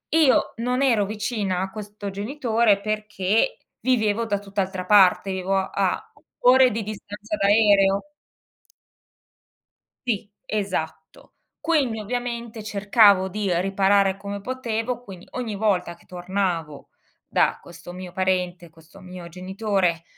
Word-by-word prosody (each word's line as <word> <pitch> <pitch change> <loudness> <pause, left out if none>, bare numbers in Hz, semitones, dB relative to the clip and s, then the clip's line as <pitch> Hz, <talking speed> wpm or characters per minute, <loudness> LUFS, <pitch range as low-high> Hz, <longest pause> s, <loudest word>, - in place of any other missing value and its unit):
Io 310 -5 +4
non 250 +3 -1
ero 230 -7 +3
vicina 210 -3 -2
a 190 +1 -2
questo 205 -1 -7
genitore 225 0 +1
perché 215 - 0 0.2
vivevo 230 -3 +1
da 205 -2 -1
tutt'altra 190 -2 -3
parte, 195 -1 +5
vivevo 190 +1 -1
a 190 0 -1 0.3
ore 255 0 +6
di 220 +1 -3
distanza 210 +5 -6
d'aereo. 200 +2 +3 2.0
Sì, 210 -3 -1 0.2
esatto. 160 -7 -4 0.3
Quindi 285 -9 +1
ovviamente 235 0 -4
cercavo 205 -2 +4
di 200 0 -2
riparare 195 0 +2
come 200 0 -6
potevo, 245 0 -3
quindi 190 -5 -11
ogni 235 -4 -4
volta 195 -4 0
che - - -24
tornavo 175 -5 -3 0.4
da - - +1
questo 175 0 -11
mio 180 0 -8
parente, 180 -2 -1
questo 165 +4 -18
mio 180 -2 -9
genitore, 185 -1 -1
200 Hz, 115 wpm, -23 LUFS, 185-225 Hz, 2.0 s, ore